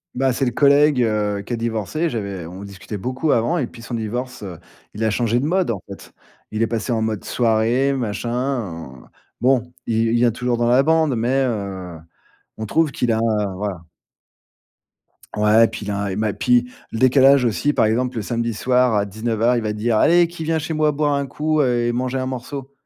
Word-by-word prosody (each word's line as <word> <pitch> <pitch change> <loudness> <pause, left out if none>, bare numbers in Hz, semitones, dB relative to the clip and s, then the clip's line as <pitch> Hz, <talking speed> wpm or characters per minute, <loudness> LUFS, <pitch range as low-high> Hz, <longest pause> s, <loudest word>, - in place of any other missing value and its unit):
Bah, 130 0 +1
c'est 135 +2 0
le 120 - 0
collègue, 140 0 +4
heu, 105 -2 -1
qui - - -5
a - - +1
divorcé, 115 - -2
j'avais 100 -7 -5
on 95 +3 -9
discutait 100 +1 -8
beaucoup 130 +8 -1
avant 155 +10 +1
et 130 - 0
depuis 115 -1 -13
son 120 - -8
divorce, 120 +3 -4
heu, 95 -5 -7 0.4
il 110 - -3
a 110 - +2
changé 120 +1 +1
de 135 - -2
mode, 180 0 +1
en 100 -5 -2
fait. 100 - -11 0.4
Il 110 +1 -1
est 115 - +1
passé 115 +2 -3
en 110 -2 0
mode 110 -2 -2
soirée 120 +4 +1
machin, 115 -2 -3
en 100 - -4 0.3
bon, 125 -1 +2
il 115 0 +1
il 115 - +1
vient 120 0 +3
toujours 125 +1 -1
dans 120 0 +1
la 125 +3 +5
bande, 160 -2 +2
mais, 125 +4 +1
heu, 95 -7 -4 0.6
on 110 - -4
trouve 160 +3 +1
qu'il 120 -3 0
a 110 - +1 0.4
voilà. 95 -3 -4 1.5
Ouais, 110 +2 +5
puis 105 - -7
il 105 - -3
a 100 - -2
un, 100 - -2
et 95 - -3
ma 105 0 -1
puis 125 0 +2 0.2
le 115 - -4
décalage 130 +1 +5
aussi 120 +6 +1
par 110 - +2
exemple 125 +3 0
le 110 - -2
samedi 115 -1 -2
soir 125 -2 +2
à 100 0 +1
19:00 115 +3 0
il 120 - 0
va 105 -1 -2
dire: 110 +1 0
«Allez 175 0 +5
qui 170 -1 -8
vient 160 0 0
chez 160 +1 -3
moi 155 -1 +2
boire 145 0 0
un 140 -1 -1
coup, 155 +2 0
heu, 120 -3 +1
et - - +1
manger 125 +2 -2
un 130 - -2
morceau?» 130 +2 -6
120 Hz, 215 wpm, -21 LUFS, 110-135 Hz, 1.5 s, la